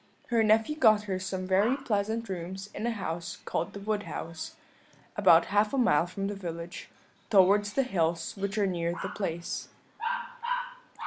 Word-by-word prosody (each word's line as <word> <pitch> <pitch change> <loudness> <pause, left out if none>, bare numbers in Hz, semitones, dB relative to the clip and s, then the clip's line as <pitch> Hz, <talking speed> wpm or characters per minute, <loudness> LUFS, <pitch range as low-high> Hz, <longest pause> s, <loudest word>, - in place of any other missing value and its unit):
Her 235 -2 +3
nephew 220 +7 +3
got 215 -6 +5
her 190 -3 -2
some 185 0 -3
very 200 +8 +3
pleasant 225 -3 -1
rooms 190 +2 -5
in 215 +3 -3
a - - +1
house 170 -5 -4
called 165 - -2
the 200 - -6
Wood 210 +1 -1
House, 165 -5 -6 0.6
about 165 +1 +6
half 210 +5 +3
a - - 0
mile 175 - +4
from 195 +2 -4
the 205 - -2
village, 170 -3 -6 0.4
towards 205 0 +5
the 270 - +3
hills 165 -8 0
which 200 +1 -3
are 205 - +3
near 170 -2 -1
the - - -2
place. 170 -4 -3
195 Hz, 165 wpm, -29 LUFS, 175-215 Hz, 0.6 s, about